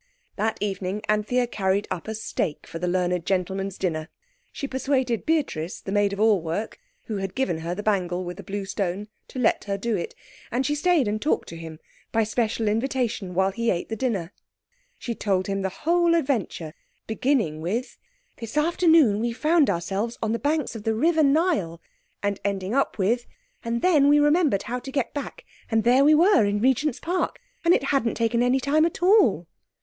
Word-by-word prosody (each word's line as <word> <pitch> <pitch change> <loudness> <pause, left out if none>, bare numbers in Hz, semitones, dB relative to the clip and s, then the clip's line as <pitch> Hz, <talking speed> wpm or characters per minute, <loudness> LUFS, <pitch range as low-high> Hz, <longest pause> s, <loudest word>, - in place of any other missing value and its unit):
That 215 +2 -1
evening 200 0 -3
Anthea 215 +4 +1
carried 200 -3 -1
up 170 - -4
a 220 - -3
steak 175 -7 -3
for 165 - -7
the 180 - -2
learned 180 -1 0
gentleman's 190 +1 -2
dinner. 160 -3 -2 0.4
She 280 - -5
persuaded 260 -3 -1
Beatrice, 270 - -1
the 195 - -7
maid 205 0 +2
of 200 - -5
all 215 -4 +4
work, 170 +7 -4 0.2
who 215 - -4
had 195 -1 -4
given 260 -12 0
her 170 +2 -3
the 205 - -5
bangle 185 -4 0
with 175 0 -6
the 200 - -9
blue 195 +2 -4
stone, 195 +1 -3 0.2
to - - -10
let 250 -3 +1
her 200 -1 -2
do 225 +2 -1
it. 465 +2 -4 0.3
And 260 +2 -1
she 295 - +1
stayed 300 -3 +2
and 215 +1 -2
talked 305 - 0
to 165 - -8
him, 160 -1 -9 0.3
by 225 - +2
special 220 0 -1
invitation, 225 -4 -1
while 190 +1 +2
he 230 +3 -1
ate 175 - -1
the 225 - -2
dinner. 205 -7 -2 0.6
She 240 - -4
told 195 -4 0
him 195 0 -2
the 190 - -1
whole 340 - +2
adventure, 230 - -1 0.3
beginning 220 - 0
with— 220 +10 -3 0.4
"This 230 +5 -7
afternoon 320 - +4
we 235 +1 -1
found 305 +2 +3
ourselves 195 +6 -2
on 220 - 0
the 230 - -1
bank 295 -2 0
of 225 - -7
the 220 +1 0
River 320 +7 +3
Nile," 285 - +2 0.4
and 205 -1 -1
ending 195 0 -2
up 275 +1 +1
with, 230 +5 0 0.4
"And 235 0 -2
then 305 -6 +5
we 295 - +6
remembered 295 - +3
how 250 +1 -3
to 270 - -8
get 270 -3 -1
back, 295 - -6 0.2
and 225 -1 +2
there 250 +3 +5
we 305 +2 +6
were 360 - +5
in 205 0 +1
Regent's 260 +3 +1
Park, 355 +2 -2 0.2
and 335 - +4
it 350 - +3
hadn't 240 -5 +1
taken 230 0 +1
any 250 +2 +3
time 285 +4 +2
at 340 - -6
all." 320 - +4
220 Hz, 195 wpm, -25 LUFS, 195-275 Hz, 0.6 s, we